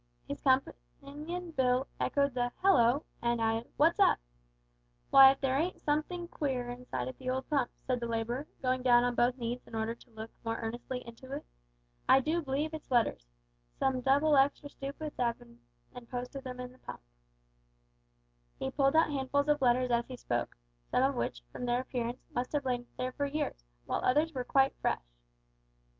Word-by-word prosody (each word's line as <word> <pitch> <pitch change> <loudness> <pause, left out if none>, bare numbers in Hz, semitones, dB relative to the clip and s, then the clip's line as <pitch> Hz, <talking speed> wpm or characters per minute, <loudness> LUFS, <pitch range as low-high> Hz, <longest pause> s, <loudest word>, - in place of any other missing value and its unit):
His - - -5
companion 295 +5 -2
Bill 255 -2 +2
echoed 280 -1 +1
the 245 -1 0
"Hallo!" 275 -7 +5 0.2
and 235 0 +1
added 225 +1 0
"What's 330 +6 +4
up?" 395 - +6 1.0
"W'y, 270 0 +11
if 270 - -4
there 270 0 +1
ain't 350 +4 -1
somethink 340 +4 -2
queer 255 -4 -2
inside 245 - -4
of 130 - -7
the 255 - -4
old 260 +1 -2
pump," 275 -5 +2 0.2
said 255 -1 0
the 235 - -3
labourer, 230 +5 -2 0.2
going 255 0 +1
down 240 -1 +5
on 245 0 +1
both 245 +2 +2
knees 240 0 -3
in - - -9
order 220 +1 -1
to 235 - -19
look 220 0 -8
more 225 0 -2
earnestly 240 +2 -4
into 235 +3 -11
it. 290 - -5 0.6
"I 265 - +8
do 320 +6 0
b'lieve 295 +2 -2
it's 315 - -7
letters. 230 - +1 0.5
Some 260 -1 +1
double 285 +4 +4
extra 280 +1 +3
stoopids 285 +2 -7
'ave 235 -2 +1
bin 120 0 -17 0.3
an' 245 -1 -10
posted 250 +2 -5
'em 250 0 -7
in 250 0 -6
the 255 - -20
pump." - - -9 1.6
He 135 - -3
pulled 275 +1 +2
out 320 -1 +4
handfuls 285 +1 0
of 295 -1 +3
letters 250 0 +3
as 235 0 +1
he 255 - -7
spoke, 120 - -2 0.3
some - - +2
of - - +3
which, - - -3
from 245 - -5
their 240 +1 +2
appearance, 245 -1 -4
must 245 +3 -2
have 290 -2 0
lain 245 -1 -1
there 255 0 -2
for 285 +2 -2
years, 280 - -3 0.2
while - - -1
others 300 +5 +2
were 255 -2 -2
quite 270 +2 +3
fresh! - - 0
255 Hz, 185 wpm, -31 LUFS, 240-280 Hz, 1.6 s, W'y